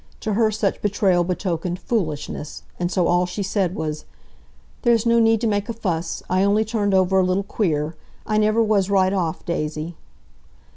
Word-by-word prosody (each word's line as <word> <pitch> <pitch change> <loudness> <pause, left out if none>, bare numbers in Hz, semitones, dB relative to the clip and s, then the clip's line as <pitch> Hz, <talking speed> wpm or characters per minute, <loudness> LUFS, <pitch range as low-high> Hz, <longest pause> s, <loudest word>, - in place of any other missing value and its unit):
To 215 - -1
her 220 +1 +3
such 210 -2 -1
betrayal 190 -3 +2
betokened 180 -1 -2
"foolishness," 155 -9 -3 0.2
and 175 0 -1
so 180 -2 +1
all 175 +1 +2
she 180 +3 -4
said 190 -2 -1
was, 155 -1 -4 0.8
"There's 235 -3 +3
no 235 0 +4
need 225 -1 +4
to - - 0
make 205 +1 -1
a - - -1
fuss! 175 -7 -3
I 185 +1 +1
only 205 +2 +3
turned 205 -3 0
over 190 0 +3
a - - +4
little 185 +2 +1
queer. 160 -6 -1 0.3
I 215 0 +1
never 215 +2 +3
was 205 -3 +2
right 190 -1 +3
off, 170 -5 -2
Daisy." 155 0 -3
190 Hz, 180 wpm, -22 LUFS, 175-215 Hz, 0.8 s, no